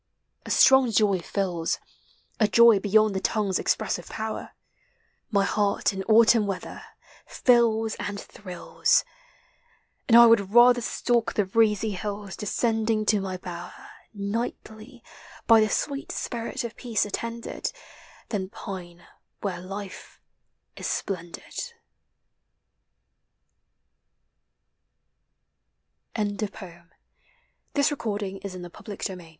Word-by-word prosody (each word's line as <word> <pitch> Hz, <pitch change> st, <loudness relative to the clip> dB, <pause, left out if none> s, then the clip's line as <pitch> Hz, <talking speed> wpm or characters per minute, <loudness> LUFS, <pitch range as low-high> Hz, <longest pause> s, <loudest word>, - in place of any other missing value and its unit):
A -, -, -6 dB
strong 265 Hz, -2 st, +6 dB
joy 205 Hz, -3 st, +2 dB
fills 175 Hz, -2 st, -2 dB, 0.6 s
(A 215 Hz, -, +4 dB
joy 230 Hz, 0 st, +6 dB
beyond 215 Hz, +1 st, +3 dB
the 190 Hz, -, -1 dB
tongue's 200 Hz, -1 st, 0 dB
expressive -, -, -1 dB
power) 220 Hz, 0 st, -5 dB, 0.8 s
My 200 Hz, -3 st, +2 dB
heart 205 Hz, 0 st, +1 dB
in 190 Hz, -, -4 dB
Autumn 225 Hz, -1 st, +5 dB
weather 195 Hz, -2 st, -5 dB, 0.3 s
— -, -, -25 dB, 0.2 s
fills 225 Hz, -3 st, +4 dB
and 205 Hz, 0 st, -4 dB
thrills! 185 Hz, -4 st, -1 dB, 1.0 s
And 230 Hz, -, +7 dB
I 235 Hz, -, +10 dB
would 225 Hz, -4 st, +4 dB
rather 245 Hz, 0 st, +7 dB
stalk 235 Hz, 0 st, 0 dB
the 205 Hz, -, +2 dB
breezy 215 Hz, +1 st, +2 dB
hills 200 Hz, 0 st, -5 dB
Descending 220 Hz, 0 st, 0 dB
to 210 Hz, -1 st, +2 dB
my 190 Hz, -1 st, -4 dB
bower 175 Hz, -1 st, -9 dB, 0.2 s
Nightly, 220 Hz, +3 st, -5 dB, 0.4 s
by 225 Hz, -1 st, +6 dB
the 215 Hz, -, +2 dB
sweet 280 Hz, +5 st, -2 dB
spirit 235 Hz, 0 st, -4 dB
of 235 Hz, -1 st, -6 dB
Peace 230 Hz, -5 st, -1 dB
attended, 230 Hz, +3 st, -4 dB, 0.6 s
Than 190 Hz, -4 st, -3 dB
pine 175 Hz, -4 st, -9 dB, 0.4 s
where 190 Hz, -3 st, -3 dB
life 195 Hz, +1 st, -8 dB, 0.6 s
is -, -, -5 dB
splendid. 190 Hz, -, -5 dB
215 Hz, 95 wpm, -26 LUFS, 195-230 Hz, 1.0 s, I